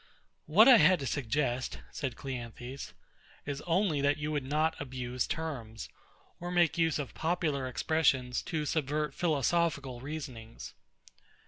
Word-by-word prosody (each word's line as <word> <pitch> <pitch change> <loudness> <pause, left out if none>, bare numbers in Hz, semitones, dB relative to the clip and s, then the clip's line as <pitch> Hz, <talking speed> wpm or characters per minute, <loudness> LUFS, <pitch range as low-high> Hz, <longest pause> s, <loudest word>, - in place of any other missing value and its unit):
What 195 - +7
I 255 -3 +10
had 185 -1 +5
to - - -3
suggest, 130 0 -1
said 135 -4 -4
CLEANTHES, 125 0 -7 0.5
is 145 -1 -4
only 170 -4 +2
that 145 +1 +2
you 150 0 -3
would 145 -2 -1
not 155 +4 +1
abuse 125 -2 -3
terms, 120 -9 -5 0.5
or 175 - -5
make 175 -2 +3
use 165 -1 +2
of 145 -3 -5
popular 160 -5 -1
expressions 130 -3 +1
to 155 -2 -3
subvert 150 -1 -1
philosophical 145 -4 0
reasonings. 130 -6 -7
145 Hz, 130 wpm, -31 LUFS, 130-160 Hz, 0.5 s, I